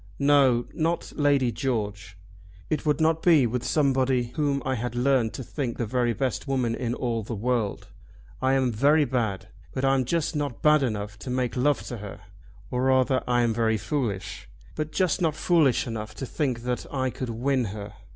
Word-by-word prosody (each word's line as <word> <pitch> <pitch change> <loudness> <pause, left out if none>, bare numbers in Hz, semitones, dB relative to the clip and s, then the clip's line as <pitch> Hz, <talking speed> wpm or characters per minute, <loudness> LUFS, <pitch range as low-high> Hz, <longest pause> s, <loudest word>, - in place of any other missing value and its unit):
"No; 140 -4 +4
not 165 +2 -1
Lady 140 -4 +2
George. 105 -7 -3 0.5
It 155 0 -1
would 150 - +2
not 160 0 +2
be 160 -7 +5
with 120 +1 -2
somebody 130 -4 +1
whom 140 -4 0
I 130 - 0
had 120 0 -3
learned 125 -2 +2
to 130 - -5
think 125 -1 -4
the 120 - -1
very 120 +1 +1
best 130 +3 -2
woman 130 -4 0
in 120 0 -2
all 115 -2 -2
the 110 +2 -5
world. 115 -1 -1 0.5
I 130 0 +2
am 130 -2 +2
very 145 +7 +4
bad, 110 -8 -2 0.3
but 130 - 0
I'm 135 -1 +2
just 165 +4 -1
not 145 -5 -3
bad 150 0 +5
enough 105 -4 -3
to 130 - -7
make 125 -2 -1
love 140 +3 +1
to 120 - -6
her. 105 -2 -9 0.5
Or 125 - -1
rather 130 0 +3
I 120 -1 +3
am 115 -1 +1
very 110 -1 +1
foolish, 105 - -3 0.2
but 155 0 -4
just 185 +2 +1
not 160 -3 +1
foolish 155 -7 +3
enough 110 -3 -5
to 135 - -5
think 130 -3 -2
that 125 0 -3
I 130 -2 -1
could 130 0 -5
win 125 +2 0
her." 105 0 -7
130 Hz, 190 wpm, -26 LUFS, 115-140 Hz, 0.5 s, be